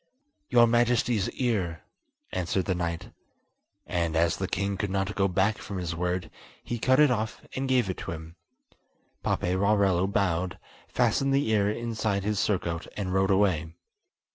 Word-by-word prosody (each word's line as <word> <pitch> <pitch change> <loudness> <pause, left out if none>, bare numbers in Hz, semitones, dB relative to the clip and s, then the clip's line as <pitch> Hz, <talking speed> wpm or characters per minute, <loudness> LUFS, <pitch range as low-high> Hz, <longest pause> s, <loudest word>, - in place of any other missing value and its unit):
"Your 120 -1 +6
Majesty's 120 -2 +2
ear," 95 -10 -1 0.5
answered 90 +1 -1
the 95 - +1
knight; 85 -2 -3 0.7
and 85 -2 -1
as 85 +1 +2
the 95 - -2
king 100 +1 -1
could 100 +1 -2
not 95 +1 -1
go 95 -1 +2
back 100 +3 +1
from 100 - -6
his 85 -2 -3
word, 90 0 -2 0.3
he 120 - -4
cut 130 +4 +3
it 150 -3 +6
off 110 -2 -2
and 135 0 -2
gave 125 -5 +3
it 95 - -3
to - - -5
him. 80 0 -8 0.9
Paperarello 95 0 +2
bowed, 95 -3 0 0.3
fastened 135 0 +2
the 140 -2 +2
ear 105 -2 +3
inside 110 -3 -1
his 105 -1 0
surcoat 85 -4 -1
and 95 -3 -2
rode 95 +1 +2
away. 90 -5 +2
95 Hz, 155 wpm, -27 LUFS, 90-110 Hz, 0.9 s, Your